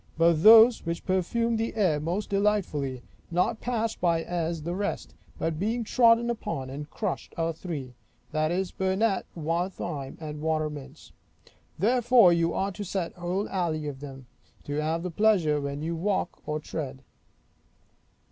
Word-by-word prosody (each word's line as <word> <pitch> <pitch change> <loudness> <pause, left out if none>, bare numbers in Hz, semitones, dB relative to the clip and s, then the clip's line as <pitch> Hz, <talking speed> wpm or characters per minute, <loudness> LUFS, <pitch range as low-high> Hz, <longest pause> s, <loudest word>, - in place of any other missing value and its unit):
But 165 -1 +4
those 225 +4 +8
which 170 0 -4
perfume 225 +5 0
the 225 0 -2
air 180 -9 +2
most 175 +8 -3
delightfully, 180 -11 0 0.3
not 180 +6 0
passed 230 -2 -2
by 170 -2 +2
as 170 -2 -2
the 170 +2 -3
rest, 200 +2 -3 0.2
but 160 -1 -2
being 225 +5 0
trodden 235 0 +4
upon 135 - -4
and 145 +2 -7
crushed, 205 -5 -4
are 165 0 0
three; 150 -7 -6 0.4
that 155 0 +1
is, 180 +2 -1
burnet, 190 +2 0
wildthyme, 165 -3 -3
and 150 -2 -6
watermints. 155 -2 -3 0.7
Therefore 235 -1 +5
you 170 0 +2
are 195 +1 -1
to 205 +2 -6
set 185 -3 -3
whole 180 +3 -2
alleys 160 -5 -1
of 135 -2 -8
them, 135 -2 -9 0.4
to 145 +1 -2
have 160 +2 -1
the 180 - -3
pleasure 170 -7 +3
when 140 +1 -4
you 165 +1 -2
walk 185 +1 -1
or 150 0 -1
tread. 140 -3 -6
170 Hz, 150 wpm, -27 LUFS, 155-205 Hz, 0.7 s, those